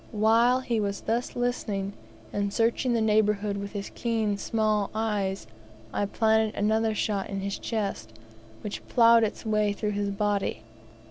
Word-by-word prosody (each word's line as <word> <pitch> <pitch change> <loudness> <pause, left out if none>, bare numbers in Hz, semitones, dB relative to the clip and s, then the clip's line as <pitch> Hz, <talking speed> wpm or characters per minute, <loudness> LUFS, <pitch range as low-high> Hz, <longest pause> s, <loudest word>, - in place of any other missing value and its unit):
While 230 +4 +4
he 235 -3 -1
was 200 -1 -2
thus 235 +2 -2
listening, 210 -5 -2 0.4
and 200 0 -1
searching 235 +3 +1
the 230 - +1
neighbourhood 210 -1 +2
with 200 +1 -6
his 200 -1 -5
keen, 225 -3 0
small 215 -1 0
eyes, 205 - -1 0.5
I 205 - 0
planted 220 0 +2
another 220 +1 +1
shot 200 -2 -1
in 195 -1 -3
his 200 0 -3
chest, 200 - -3 0.5
which 205 - -6
ploughed 230 -1 +6
its 215 - -3
way 215 -1 +1
through 210 +1 -2
his 205 0 -1
body. 200 - -1
210 Hz, 150 wpm, -27 LUFS, 200-225 Hz, 0.5 s, ploughed